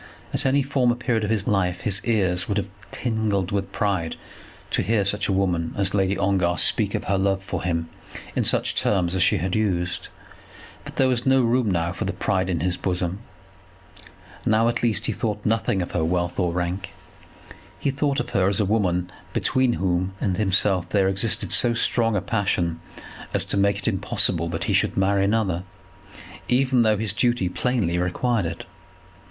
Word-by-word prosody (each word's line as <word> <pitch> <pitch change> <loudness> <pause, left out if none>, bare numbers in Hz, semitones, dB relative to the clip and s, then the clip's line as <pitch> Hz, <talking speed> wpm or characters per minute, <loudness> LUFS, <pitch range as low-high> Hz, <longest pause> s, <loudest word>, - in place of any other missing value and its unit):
At - - +2
any 140 +1 +3
former 130 -3 +1
period 120 -2 -1
of 105 - -2
his 110 -3 0
life 90 -3 0
his 100 -2 +3
ears 95 -6 +1
would 100 - -1
have 100 - -1 0.2
tingled 110 -5 -1
with 100 -1 -2
pride 95 -6 -1 0.6
to - - +1
hear 110 -3 +1
such 100 +1 0
a - - 0
woman 90 -4 0
as 100 -1 +2
Lady 95 -1 +1
Ongar 95 -3 +1
speak - - +2
of - - -2
her 100 -1 0
love 95 0 0
for 95 -3 -4
him 85 -2 -1 0.5
in - - +1
such - - +2
terms 90 -3 +1
as 95 - 0
she 90 - +4
had 90 +2 -2
used; 90 -5 -1 0.8
but - - -10
there 135 - +3
was 125 0 0
no 135 -1 +4
room 120 -1 +2
now 85 -2 0
for - - -4
pride 95 0 -1
in 85 -4 -1
his 90 +1 -1
bosom. 90 0 -2 1.2
Now 110 +1 +3
at 120 - 0
least 115 -1 0
he - - 0
thought 105 -2 -3
nothing 105 -4 +1
of - - -8
her 85 - 0
wealth 85 +2 -1
or 90 -2 +1
rank. 90 +2 -3 0.8
He 140 - -1
thought 140 0 0
of 120 0 -4
her 95 -1 +2
as 100 -1 +3
a 105 - +2
woman 95 -4 0 0.2
between 130 -2 +2
whom 95 -1 -1
and 95 -3 0
himself 95 -2 +2
there 95 -2 +2
existed 95 +3 -1
so 120 -1 +3
strong 115 -1 +1
a 100 - +1
passion 90 -5 -1 0.5
as - - +2
to - - -1
make 100 0 +2
it 100 - -5
impossible 95 -5 0
that 80 0 -3
he - - -1
should - - +1
marry 95 0 +2
another, 100 -4 +1 0.9
even 130 0 +3
though 110 -2 +3
his 105 -2 -1
duty 120 -4 +1
plainly 95 -4 0
required 95 +3 0
it. 85 +1 -6
100 Hz, 185 wpm, -23 LUFS, 90-110 Hz, 1.2 s, she